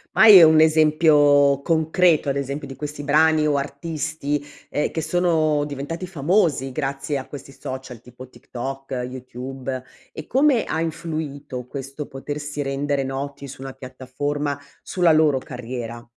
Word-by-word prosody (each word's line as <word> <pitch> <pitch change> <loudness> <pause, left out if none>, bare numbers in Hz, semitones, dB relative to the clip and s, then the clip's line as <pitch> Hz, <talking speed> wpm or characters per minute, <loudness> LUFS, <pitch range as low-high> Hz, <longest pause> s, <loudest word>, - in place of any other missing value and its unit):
Ma - - +6
hai 205 -5 +10
un 160 0 +7
esempio 150 -3 +4
concreto 160 0 +2
ad 135 - 0
esempio 140 +1 -4
di 135 - -9
questi 150 0 -6
brani 155 +1 +3
o 145 - +2
artisti, 145 0 -3 0.3
ehm, 150 - -1
che 160 - -3
sono 155 -3 +1
diventati 145 +5 -5
famosi 155 -5 +1
grazie 140 0 -2
a 130 - -6
questi 140 -1 -10
social 130 -3 -8
tipo, 125 +1 -12
TikTok, 135 +2 -7 0.2
YouTube 130 +1 -6 0.3
e 155 - -9
come 270 -2 +3
ha 160 - -2
influito 150 -6 -5
questo 140 +2 -7
potersi 145 +2 -5
rendere 140 0 -1
noti 140 +1 -5
su 135 0 -10
una 135 0 -6
piattaforma 140 +2 -4 0.2
sulla 175 -3 +2
loro 155 -3 +4
carriera? 120 -2 -7
145 Hz, 140 wpm, -22 LUFS, 135-155 Hz, 0.3 s, hai